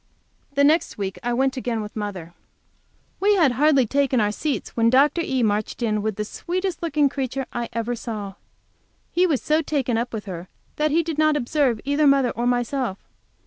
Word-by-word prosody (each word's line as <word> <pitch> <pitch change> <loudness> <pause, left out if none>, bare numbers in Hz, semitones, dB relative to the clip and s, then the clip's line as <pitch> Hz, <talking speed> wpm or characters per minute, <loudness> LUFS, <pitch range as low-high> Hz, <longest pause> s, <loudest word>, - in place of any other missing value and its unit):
the 280 - +4
next 310 +4 +3
week 195 -2 -4
I 240 - -2
went 265 +2 +1
again, 240 -3 -2
with 210 -1 -7
mother. 195 -6 -5 0.9
We 410 +2 +4
had 320 -9 +4
hardly 275 +1 +4
taken 275 +1 +1
our 210 -1 +2
seats 290 +6 -3
when 230 0 +3
Dr. 285 +6 +4
E. 260 -5 0
marched 215 +2 -1
in 215 -2 0
with 215 -1 -2
the 210 - -3
sweetest 365 - -3
looking 310 -3 0
little 280 - +3
creature 270 -1 -2
I 240 -1 -3
ever 235 +1 -2
saw. 215 -4 -5 0.8
He 360 +1 +3
was 295 -7 0
so 310 +1 +2
taken 265 -7 -1
up 240 +1 -3
with 220 -2 -5
her 180 -2 -7 0.3
that 305 0 +2
he 330 +3 +2
did 320 -2 -4
not 310 -1 +4
observe 255 -3 +1
either 285 +2 +2
mother 275 -3 +4
or 240 +1 -2
myself. 245 -3 -1
255 Hz, 195 wpm, -23 LUFS, 225-295 Hz, 0.9 s, the